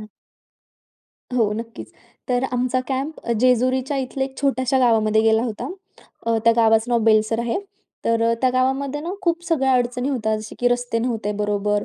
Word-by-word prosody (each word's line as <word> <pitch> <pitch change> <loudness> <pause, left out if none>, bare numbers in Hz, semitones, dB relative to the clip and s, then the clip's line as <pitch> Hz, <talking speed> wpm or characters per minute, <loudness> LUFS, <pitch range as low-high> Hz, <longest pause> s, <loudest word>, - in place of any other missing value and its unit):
हं. 215 - -10 1.3
हो, 225 -4 +2
नक्कीच. 230 +1 -7 0.4
तर 250 +1 +1
आमचा 250 +1 0
कॅम्प 275 +4 -3 0.2
जेजुरीच्या 255 +2 +2
इथल्या 265 0 -2
एक 265 - -15
छोट्याशा 265 -1 +1
गावामध्ये 220 -3 +3
गेला 225 +1 +3
होता. 235 +1 -4 0.6
अ, 230 - +2
त्या 230 - +6
गावाचं 225 +1 +3
नाव 240 - +3
बेलसर 220 0 +3
आहे. 235 +5 -1 0.5
तर 230 0 +1
अ, - - +3
त्या 255 - +3
गावामध्ये 265 +3 0
ना 335 +4 -4
खूप 340 -1 0
सगळ्या 280 -6 +1
अडचणी 245 +1 0
होत्या, 220 -6 0
जसे 215 0 -8
की 245 - +3
रस्ते 245 -1 -1
नव्हते 225 -3 -2
बरोबर, 205 0 0
245 Hz, 165 wpm, -21 LUFS, 225-260 Hz, 1.3 s, त्या